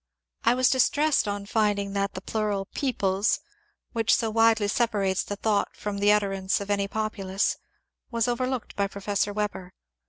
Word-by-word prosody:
I 235 +2 +4
was 255 +1 +4
distressed 285 +1 +3
on 205 0 -3
finding 205 -2 0
that 200 0 -1
the 185 - -5
plural 205 -1 -1
" - - -44
peoples 200 -7 +1 0.2
" 420 0 -39
— - - -46
which 230 0 +3
so 225 -2 -1
widely 225 -1 +4
separates 205 -4 +1
the 205 - -5
thought 205 0 0
from 205 -1 -4
the 205 +1 +5
utterance 195 -2 +1
of 200 0 -4
any 200 -1 +1
populace 200 -2 -1 0.3
— - - -53 0.2
was 230 -1 0
overlooked 255 0 -2
by 200 -1 +1
Professor 200 +1 -1
Weber. 200 -3 -4
205 Hz, 180 wpm, -26 LUFS, 200-230 Hz, 0.3 s, the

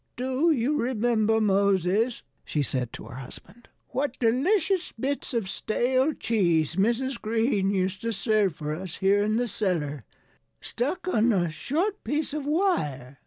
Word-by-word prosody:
"Do 260 +6 +1
you 290 0 +2
remember, 225 -2 +1
Moses," 200 +2 +2 0.2
she 150 - -1
said 125 -3 -2
to - - -8
her 115 +3 -9
husband, 205 - -11 0.2
"what 265 0 -2
delicious 340 - +1
bits 275 +3 -2
of 225 -5 0
stale 255 +8 +1
cheese 170 - +1
Mrs. 235 +6 0
Green 220 -2 +1
used 190 -1 -1
to 230 - -1
serve 210 -4 +1
for 150 0 -4
us 180 +2 -6
here 200 +1 +3
in 215 +1 +1
the 245 0 0
cellar, 165 - -2 0.6
stuck 320 +10 -3
on 235 -9 +3
a 175 -6 +1
short 345 - -2
piece 295 0 -2
of 295 -2 -3
wire? 150 - 0
225 Hz, 150 wpm, -26 LUFS, 185-260 Hz, 0.6 s, here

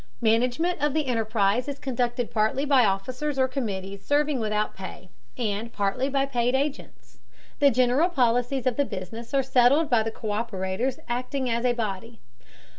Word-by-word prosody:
Management 250 +9 +1
of 295 -1 +1
the 310 -2 +1
enterprise 225 -1 +1
is 285 -1 -4
conducted 245 -3 -2
partly 220 +5 +1
by 275 -3 +5
officers 255 +9 -2
or 260 -1 +3
committees 200 -7 -4
serving 290 -1 +1
without 215 -1 -1
pay, 190 -1 -9 0.3
and 225 -1 -2
partly 205 +7 -1
by 275 0 +1
paid 250 -2 0
agents. 280 +1 -4 0.4
The 285 -2 +6
general 255 +7 +3
policies 245 -3 +1
of 255 -2 +1
the 285 - +2
business 225 +3 -7
are 270 - +3
settled 265 +4 +3
by 235 -2 +5
the 220 - -2
co÷perators 215 +2 -2
acting 250 +1 -2
as 235 +2 0
a 245 - +3
body. 225 0 -4
245 Hz, 160 wpm, -26 LUFS, 220-270 Hz, 0.4 s, The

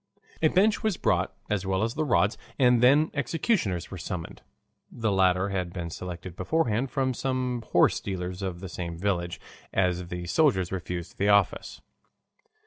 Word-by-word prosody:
A 160 - +5
bench 200 +6 +3
was 215 -5 0
brought - - +1 0.2
as 105 -3 -1
well 95 +1 0
as 115 +1 -1
the 155 - -1
rods, 120 -6 +2 0.2
and 125 -3 +4
then 145 +6 +5
the - - -14
executioners 140 - 0
were 95 - -6
summoned 80 -7 -6 0.5
(the 115 -3 -1
latter 95 0 +3
had 90 -3 -2
been 85 -2 -5
selected 90 0 -7
beforehand 130 - 0
from 130 -2 0
some 125 -1 -2
horsestealers 90 -1 +1
of 90 -2 -4
the 95 - -5
same 85 -1 -5
village, 85 -2 -1 0.3
as 90 -1 0
the 90 0 -5
soldiers 95 - +2
refused 90 -1 -5
the 100 +1 +2
office). 100 -3 +2
95 Hz, 160 wpm, -27 LUFS, 90-125 Hz, 0.5 s, A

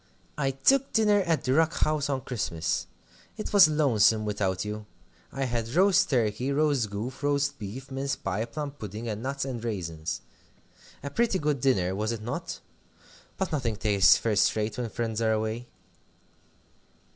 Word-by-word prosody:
'I 135 -2 +1
took 275 0 +4
dinner 210 -2 +4
at 165 -2 +1
the 130 - +1
Rock 160 +2 +3
House 155 -1 0
on 135 -2 -1
Christmas. 95 -10 -2 0.5
It 215 - -5
was 200 -4 +9
lonesome 115 -8 +3
without 100 -2 -1
you. 105 0 -6 0.4
I 135 - -3
had 115 -2 -2
roast 195 +1 +4
turkey, 120 0 0
roast 140 -6 +1
goose, 110 +7 -5
roast 145 0 0
beef, 125 +7 -7
mince 135 +1 -2
pie, 100 +4 -2
plum 145 +4 -5
pudding, 110 -4 -7
and 105 -1 -3
nuts 135 +2 -3
and 125 -4 -5
raisins. 85 -7 -4 0.8
A 140 - -5
pretty 230 -4 +1
good 150 -5 -1
dinner, 95 -9 +2
was 105 +3 -1
it 115 -2 -5
not? 140 +9 -5 0.8
But 190 - -2
nothing 125 -8 -1
tastes 100 -2 +5
first 105 -4 +2
rate 105 -1 -1
when 120 -2 -2
friends 115 -1 -3
are 110 -1 +2
away.'" 110 +3 -2
120 Hz, 160 wpm, -27 LUFS, 105-145 Hz, 0.8 s, was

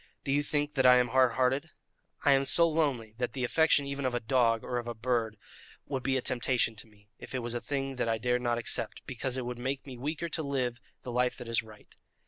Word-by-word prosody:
Do 135 - -2
you 145 +1 +3
think 145 0 -1
that 130 -3 +2
I 125 0 +8
am 125 0 +2
hard 130 -2 +4
hearted? 130 +5 +1 0.6
I 145 - +6
am 135 0 +4
so 170 +5 +5
lonely 140 -9 0
that 125 -2 -1
the 130 - -3
affection 155 +2 +3
even 140 0 -4
of 130 -2 0
a - - +1
dog 115 -1 +2
or 125 - -2
a 120 0 -5
bird 115 -2 -1 0.5
would 135 -2 -3
be 135 +1 +1
a 130 - -2
temptation 120 -2 +1
to 110 - -4
me, 105 -1 -24
if - - -8
it 125 - -2
was 120 0 -3
a 120 - -3
thing 135 -2 -3
that 120 - 0
I 115 - +1
dared 125 +2 0
not 120 -1 0
accept, 120 - -2
because 130 0 -3
it 130 - -3
would 125 0 -5
make 135 +2 -3
me 130 -3 -8
weaker 150 +5 -3
to 160 - -2
live 130 -4 -2 0.2
the 125 - -5
life 125 +1 +1
that 125 - -8
is 115 0 +1
right. 110 -1 -16
125 Hz, 250 wpm, -30 LUFS, 120-135 Hz, 0.6 s, I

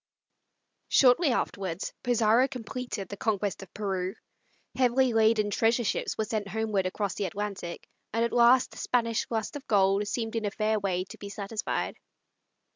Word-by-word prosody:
Shortly 275 +5 +5
afterwards, 190 -6 -2
Pizarro 240 +1 +3
completed 250 -4 -5
the 200 - -7
conquest 205 -2 -1
of 195 - -11
Peru. 195 -2 -3 0.6
Heavily 255 0 +3
laden 220 -1 +3
treasure 230 +3 +2
ships 210 - -1
were 220 - 0
sent 210 -1 -2
homeward 210 -3 0
across 195 0 -2
the 205 - -2
Atlantic, 195 -2 -5 0.2
and 230 +2 +1
at 235 - -3
last 240 +1 +5
the - - -13
Spanish 230 -2 0
lust 225 +4 -2
of 285 - -8
gold 195 0 +3
seemed 225 +1 -3
in 225 -2 -1
a - - +1
fair 215 +1 0
way 185 -2 -1
to 185 - -12
be 200 - -7
satisfied. 205 +2 -3
215 Hz, 160 wpm, -28 LUFS, 200-235 Hz, 0.6 s, Shortly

